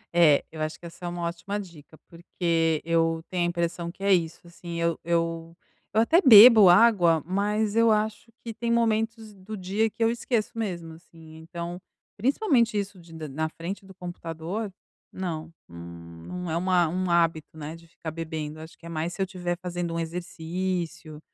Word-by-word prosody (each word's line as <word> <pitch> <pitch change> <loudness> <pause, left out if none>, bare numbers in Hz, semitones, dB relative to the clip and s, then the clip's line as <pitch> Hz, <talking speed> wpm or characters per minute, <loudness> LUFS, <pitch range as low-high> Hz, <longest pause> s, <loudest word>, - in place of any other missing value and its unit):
É, 155 -5 +5
eu 160 - -7
acho 155 0 -3
que - - -13
essa 170 +1 -10
é - - -2
uma 175 0 -4
ótima 175 +5 -3
dica 165 -5 -12
porque 165 -2 -1
eu 165 -1 +1
tenho 180 -2 +1
a - - +1
impressão 170 0 -2
que 195 - -12
é 200 0 +4
isso, 170 -3 0
assim, 170 0 -8
eu 170 -1 0
eu 165 0 -2 0.3
eu 220 - +2
até 325 +10 +4
bebo 220 - +10
água, 175 -6 +5
mas 205 +3 0
eu 230 0 +5
acho 215 +1 -1
que 230 -1 -6
tem 235 +2 -2
momentos 225 -1 0
do 200 +2 -8
dia 200 +4 0
que 225 - -3
eu 225 - +3
esqueço 235 -2 -1
mesmo, 175 -7 -4
assim, 160 -1 -15
então 170 +2 -7 0.3
principalmente 240 - +2
isso 200 -1 -4
de 170 -1 -16 0.2
na 155 +3 -2
frente 185 +5 -6
do 190 - -14
computador, 175 +4 -5 0.4
não. 165 -3 -5 0.2
Hum, 85 -1 -11
não 180 -2 -5
é 165 - 0
um 185 +2 -2
a 175 -2 +4
um 185 +3 -2
hábito, 165 -2 +1
né, 155 +1 -6
de 165 0 -16
ficar 165 -1 -8
bebendo. 155 -1 -5
Acho 160 +1 -11
que - - -17
é - - -7
mais 165 +1 -3
se 195 - -5
eu - - +2
estiver 175 -2 -4
fazendo 175 -1 -3
um - - -1
exercício, 170 -1 -4
175 Hz, 190 wpm, -26 LUFS, 165-200 Hz, 0.4 s, bebo